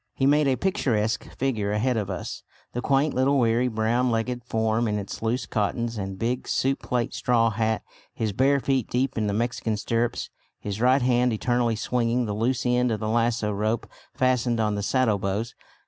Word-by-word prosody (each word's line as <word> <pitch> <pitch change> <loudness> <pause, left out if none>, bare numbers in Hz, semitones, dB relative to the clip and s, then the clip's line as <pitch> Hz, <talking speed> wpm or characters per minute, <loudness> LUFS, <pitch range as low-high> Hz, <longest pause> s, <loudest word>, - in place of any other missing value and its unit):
He 135 - +1
made 145 +1 +4
a 135 - +3
picturesque 120 - 0
figure 110 -7 0
ahead 120 +4 +1
of 105 -3 -2
us, 90 -3 -5 0.3
the 120 - -2
quaint 140 +3 +2
little 135 +2 +2
wiry 120 0 +2
brown 120 +2 +1
legged 120 +1 -1
form 110 0 0
in 105 -1 0
its 100 -1 -6
loose 115 +2 -1
cottons 115 +2 -1
and 95 -2 -4
big 120 +4 -2
soup 135 +1 0
plate 120 -2 -1
straw 115 -2 +2
hat, 110 0 0 0.3
his 110 -3 -2
bare 135 +6 +3
feet 130 -3 0
deep 130 +2 0
in 110 -2 0
the - - 0
Mexican 115 -1 -1
stirrups, 115 +2 -1 0.3
his 105 +1 -5
right 130 +2 +4
hand 125 -1 +3
eternally 120 +1 +1
swinging 120 +2 0
the 105 - -2
loose 120 +5 0
end 125 0 +2
of 110 - -1
the 110 - -3
lassoo 115 -1 +1
rope 110 +3 -1 0.3
fastened 125 -2 +1
on 105 -1 +1
the 100 - -2
saddlebows. 110 -1 0
115 Hz, 185 wpm, -25 LUFS, 110-125 Hz, 0.3 s, made